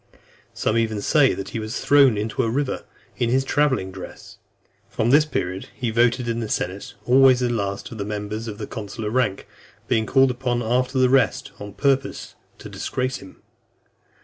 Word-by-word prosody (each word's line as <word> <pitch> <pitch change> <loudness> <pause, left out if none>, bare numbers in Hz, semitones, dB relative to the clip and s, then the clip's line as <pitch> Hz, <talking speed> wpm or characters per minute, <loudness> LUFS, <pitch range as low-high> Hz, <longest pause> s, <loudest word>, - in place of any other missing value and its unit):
Some 110 +2 +1
even 110 -2 -1
say, 135 +5 +3
that 95 - -6
he 115 - -4
was 110 +2 -4
thrown 135 -4 +5
into 105 +2 -1
a 115 - 0
river, 135 +3 -2 0.3
in 120 - 0
his 130 +2 +2
travelling 135 -11 +1
dress. 95 -1 -11 0.5
From 115 +2 0
this 150 +2 +6
period, 95 -10 -3
he 120 -4 -2
voted 120 +2 +2
in 115 0 -1
the 110 -2 -4
senate 95 +1 -3
always 130 0 +6
the 120 -1 +1
last 100 -3 -3
of 115 - -8
the - - -1
members 105 +2 -4
of 105 -1 -6
consular 105 -1 -5
rank; 125 -5 0 0.4
being 110 -1 +1
called 135 -1 +4
upon 125 -1 -2
after 125 +3 0
the 130 0 +5
rest, 130 -2 +2
on 105 -1 -8
purpose 135 +1 -1 0.2
to - - -10
disgrace 130 +1 -3
him. 95 - -15
120 Hz, 175 wpm, -23 LUFS, 105-130 Hz, 0.5 s, this